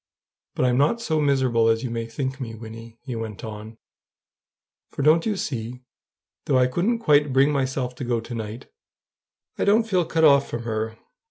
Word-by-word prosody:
But - - +1
I'm 125 0 +2
not 150 +12 +2
so 160 -9 -1
miserable 130 -5 +2
as 115 0 +2
you 125 - -3
may 115 -1 -3
think 130 +3 -4
me, 115 -3 -5
Wynnie," 115 +1 -10
he 130 -4 -5
went 110 -2 -6
on; 110 0 -8 1.1
"for 140 - -4
don't 160 +6 +4
you 210 -2 0
see? 125 -4 -5 0.6
though 135 - +2
I 125 - +5
couldn't 180 - 0
quite 150 - +3
bring 135 +3 +4
myself 130 -2 -1
to - - -5
go 120 -1 0
to 115 +2 -8
night, 110 0 -6 0.9
I - - +2
don't 220 +3 +3
feel 185 -5 +1
cut 160 0 0
off 140 -2 +5
from 115 0 -4
her. 110 0 -3
130 Hz, 185 wpm, -24 LUFS, 115-145 Hz, 1.1 s, I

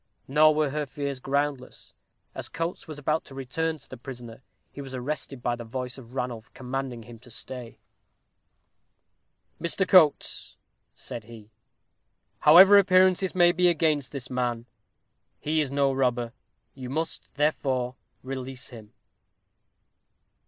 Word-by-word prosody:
Nor 155 +2 +5
were 155 -2 +2
her 150 0 -2
fears 140 0 -4
groundless. 140 0 -3 0.4
As - - -6
Coates 165 +2 -4
was 155 -2 -7
about 155 +2 0
to 135 - -12
return 160 +5 -2
to 140 - -19
the 130 - -9
prisoner, 120 -1 -9 0.3
he 140 - -8
was 135 -1 -7
arrested 135 -1 -4
by 120 - +1
the 120 - -8
voice 125 +2 -5
of 125 0 -14
Ranulph, 125 -3 -4
commanding 130 -2 -4
him 115 0 -12
to 125 +2 -16
stay. 120 0 -7 1.8
"Mr. 180 +3 0
Coates," 165 -6 +3 0.4
said 115 -3 -8
he, 110 -2 -13 0.9
"however 190 +6 +9
appearances 185 -1 +4
may 175 -1 +6
be 180 +1 +3
against 155 -4 +1
this 130 -4 -6
man, 120 -2 -1 0.7
he 155 +1 +1
is 145 - -1
no 140 0 +2
robber 125 -3 0 0.4
you 130 -2 -8
must, 160 +4 -4
therefore, 130 -4 0 0.3
release 130 -1 -5
him." 110 -4 -12
135 Hz, 135 wpm, -27 LUFS, 125-155 Hz, 1.8 s, however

